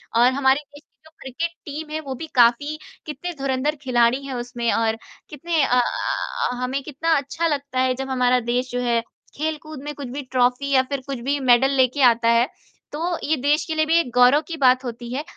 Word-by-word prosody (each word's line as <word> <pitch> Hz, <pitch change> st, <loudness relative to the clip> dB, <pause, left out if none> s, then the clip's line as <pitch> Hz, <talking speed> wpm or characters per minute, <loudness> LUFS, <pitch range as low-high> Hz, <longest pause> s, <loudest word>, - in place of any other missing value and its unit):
और 245 Hz, +2 st, +5 dB
हमारे 265 Hz, +1 st, +3 dB
देश 290 Hz, -, -13 dB
की -, -, -57 dB
जो 315 Hz, -, -17 dB
क्रिकेट 325 Hz, +6 st, -4 dB
टीम 300 Hz, +1 st, -6 dB
है 310 Hz, -, -2 dB
वो 270 Hz, -3 st, -6 dB
भी 320 Hz, +5 st, -7 dB
काफ़ी 250 Hz, +6 st, +3 dB, 0.3 s
कितने 320 Hz, +4 st, -5 dB
धुरंधर 270 Hz, +2 st, -1 dB
खिलाड़ी 250 Hz, 0 st, +2 dB
हैं 270 Hz, -, -5 dB
उसमें 240 Hz, -1 st, -2 dB
और 225 Hz, -1 st, +1 dB, 0.3 s
कितने 315 Hz, +1 st, -1 dB
अ 250 Hz, -1 st, +3 dB, 0.7 s
अ, -, -, -3 dB
हमें 260 Hz, +2 st, -2 dB
कितना 310 Hz, +3 st, -1 dB
अच्छा 285 Hz, +4 st, -2 dB
लगता 280 Hz, -4 st, -2 dB
है 255 Hz, 0 st, +2 dB
जब 270 Hz, +1 st, -5 dB
हमारा 250 Hz, -1 st, +2 dB
देश 250 Hz, +1 st, -1 dB
जो 245 Hz, -, -2 dB
है 235 Hz, -1 st, +1 dB, 0.4 s
खेलकूद 310 Hz, -1 st, -4 dB
में 295 Hz, -, -5 dB
कुछ 280 Hz, -2 st, -7 dB
भी 280 Hz, +3 st, -5 dB
ट्रॉफी 255 Hz, +2 st, +1 dB
या 260 Hz, -, +6 dB
फिर 280 Hz, -2 st, -2 dB
कुछ 270 Hz, -3 st, -4 dB
भी 280 Hz, +4 st, -1 dB
मेडल 260 Hz, 0 st, +4 dB
लेके 260 Hz, +2 st, +2 dB
आता 235 Hz, -2 st, +4 dB
है, 235 Hz, +1 st, +4 dB, 0.5 s
तो 335 Hz, +3 st, -2 dB
ये 315 Hz, +2 st, +1 dB
देश 290 Hz, +4 st, +1 dB
के 320 Hz, -, -3 dB
लिए 310 Hz, 0 st, +2 dB
भी 325 Hz, +2 st, +3 dB
एक 250 Hz, -, -2 dB
गौरव 250 Hz, +4 st, +6 dB
की 330 Hz, -, -5 dB
बात 255 Hz, -2 st, +4 dB
होती 240 Hz, -1 st, -7 dB
है 285 Hz, +3 st, -2 dB
270 Hz, 215 wpm, -22 LUFS, 250-300 Hz, 0.7 s, या